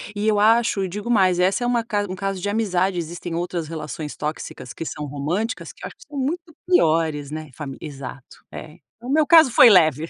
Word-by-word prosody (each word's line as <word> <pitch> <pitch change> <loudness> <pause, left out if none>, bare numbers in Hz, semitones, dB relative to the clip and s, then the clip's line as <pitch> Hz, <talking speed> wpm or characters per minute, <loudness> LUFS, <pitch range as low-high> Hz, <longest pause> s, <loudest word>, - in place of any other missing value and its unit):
e 205 +1 -1
eu 210 -1 +3
acho 220 -2 +3
e 190 - -1
digo 205 +6 -6
mais 185 -6 +3
essa 190 +6 +2
é 245 - 0
uma 240 -1 +1
ca 210 -3 -1
um 185 - -4
caso 195 0 -3
de 205 - -3
amizade, 195 -4 0
existem 170 0 -5
outras 170 -2 -3
relações 155 -1 -6
tóxicas, 150 -4 -6
que 165 - -6
são 150 -1 -5
românticas 155 - -3
que - - -18
eu - - -3
acho - - -14
que - - -16
são 290 -1 -9
muito 325 +4 -3
piores, 160 - +2
né, 155 -1 -7
fami 135 -1 -7
exato 140 -3 -9
é, 155 +1 -10 0.2
o 245 - -8
meu 300 +1 +3
caso 320 -6 +7
foi 240 - +8
leve. 160 - +4
180 Hz, 220 wpm, -22 LUFS, 155-225 Hz, 0.2 s, foi